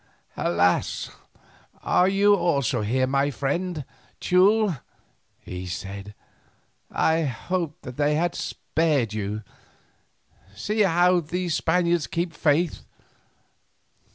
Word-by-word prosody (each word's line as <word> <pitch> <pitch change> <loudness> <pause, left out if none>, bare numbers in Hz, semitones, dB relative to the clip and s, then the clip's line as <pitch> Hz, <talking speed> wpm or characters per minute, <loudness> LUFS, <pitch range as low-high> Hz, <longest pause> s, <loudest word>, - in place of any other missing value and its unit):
"Alas! 90 +1 +1 0.7
are 180 - +3
you 200 +1 +4
also 140 - +1
here, 130 +5 +1
my 140 +2 +1
friend 150 +3 -2 0.3
Teule?" 190 - +3 0.6
he 90 0 -7
said; 100 +3 -6 0.7
"I 160 +1 +2
hoped 160 +4 -3
that 125 -1 -8
they 150 0 +2
had 175 +2 0
spared 145 -9 -1
you. 105 0 -3 1.1
See 210 - -3
how 180 -1 +4
these 175 +1 -3
Spaniards 170 -1 +1
keep 170 0 -2
faith. 160 +1 +1
160 Hz, 100 wpm, -25 LUFS, 125-180 Hz, 1.1 s, you